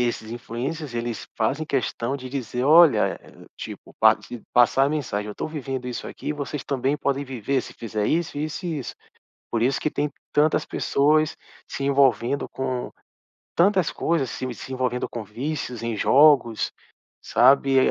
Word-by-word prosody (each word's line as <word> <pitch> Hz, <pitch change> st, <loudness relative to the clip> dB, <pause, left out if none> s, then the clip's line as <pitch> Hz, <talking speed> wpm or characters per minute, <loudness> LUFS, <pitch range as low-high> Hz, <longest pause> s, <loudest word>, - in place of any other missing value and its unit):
esses 110 Hz, -2 st, -5 dB
influencers 125 Hz, +5 st, -5 dB
eles 120 Hz, -1 st, -4 dB
fazem 135 Hz, +8 st, 0 dB
questão 130 Hz, -1 st, -1 dB
de 130 Hz, -2 st, -8 dB
dizer: 125 Hz, -2 st, -3 dB
"Olha," 160 Hz, +1 st, +6 dB
eh, -, -, -17 dB
tipo, -, -, -9 dB
pa -, -, +6 dB, 0.3 s
passar 125 Hz, +2 st, +5 dB
a -, -, +2 dB
mensagem, 125 Hz, -9 st, -2 dB
"Eu 105 Hz, -, -6 dB
tô -, -, -4 dB
vivendo 135 Hz, -5 st, -5 dB
isso 125 Hz, -, -5 dB
aqui, -, -, -5 dB
vocês 145 Hz, -1 st, -5 dB
também 135 Hz, +1 st, 0 dB
podem 140 Hz, -1 st, -1 dB
viver 130 Hz, 0 st, -1 dB
se -, -, -11 dB
fizer 110 Hz, -2 st, -3 dB
isso, 160 Hz, -2 st, 0 dB
isso 155 Hz, +5 st, -4 dB
e 165 Hz, -3 st, -2 dB
isso." 130 Hz, -, -6 dB, 0.6 s
Por 115 Hz, -, 0 dB
isso 130 Hz, +3 st, +2 dB
que 155 Hz, -, 0 dB
tem 145 Hz, 0 st, -1 dB, 0.2 s
tantas 150 Hz, +1 st, +3 dB
pessoas 155 Hz, +2 st, +2 dB, 0.3 s
se 140 Hz, -, -4 dB
envolvendo 135 Hz, -1 st, +2 dB
com 130 Hz, -2 st, -3 dB, 0.7 s
tantas 185 Hz, -1 st, +3 dB
coisas 160 Hz, -7 st, 0 dB
se 130 Hz, +2 st, -4 dB
se 130 Hz, -, -8 dB
envolvendo 125 Hz, -1 st, -1 dB
com 115 Hz, -, -5 dB
vícios 125 Hz, +2 st, -4 dB
em 115 Hz, -1 st, -2 dB
jogos, 130 Hz, -2 st, +4 dB, 0.5 s
sabe? 135 Hz, +2 st, +4 dB
E -, -, +7 dB
135 Hz, 165 wpm, -24 LUFS, 120-150 Hz, 0.7 s, E